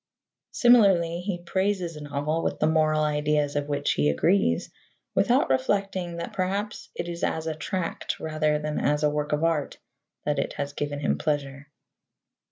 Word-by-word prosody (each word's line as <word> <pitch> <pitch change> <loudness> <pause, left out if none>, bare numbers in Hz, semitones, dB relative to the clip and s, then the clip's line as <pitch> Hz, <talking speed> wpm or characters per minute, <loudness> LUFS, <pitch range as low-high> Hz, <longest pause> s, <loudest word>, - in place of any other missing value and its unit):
Similarly, 195 -9 +4
he 180 -2 -4
praises 190 -1 -1
a 150 - -8
novel 145 +2 -2
with - - -1
the - - +1
moral 155 -1 +3
ideas 150 -1 +1
of 145 0 -1
which 145 - 0
he 75 +1 +2
agrees, 85 - +2 0.4
without - - +3
reflecting 175 +5 0
that 170 - -5
perhaps 200 +3 -2
it - - -4
is 170 0 -5
as 160 0 -1
a 160 - -1
tract 170 +3 -3
rather 155 -1 0
than 150 0 -3
as 150 +1 +1
a 150 - +3
work 150 0 -2
of 150 +1 0
art 165 -4 0 0.5
that 150 0 0
it - - -2
has 145 0 -4
given 145 0 -3
him - - 0
pleasure. 145 -2 -2
155 Hz, 170 wpm, -26 LUFS, 145-175 Hz, 0.5 s, Similarly